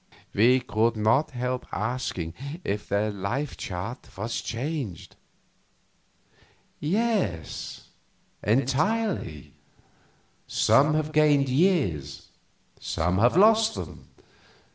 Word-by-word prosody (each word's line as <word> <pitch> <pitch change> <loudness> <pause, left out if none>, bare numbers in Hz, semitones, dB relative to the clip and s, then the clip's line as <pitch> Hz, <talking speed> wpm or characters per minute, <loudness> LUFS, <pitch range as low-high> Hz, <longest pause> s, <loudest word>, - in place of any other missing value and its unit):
We 125 +5 +4
could 115 -1 +1
not 110 +8 +3
help 125 -1 -3
asking 105 -7 -3 0.3
if 105 +1 -3
their 105 +2 +1
life 115 +9 -3
chart 95 +8 -6
was 115 +4 -3
changed. 125 - -4 1.6
"Yes, 185 - -2 0.5
entirely. 135 - 0 0.9
Some 150 +3 +4
have 155 0 -1
gained 150 -3 +4
years, 125 - +1 0.5
some 90 +3 -1
have 120 +9 +4
lost 220 +2 +5
them. - - -8
125 Hz, 85 wpm, -26 LUFS, 100-155 Hz, 1.6 s, lost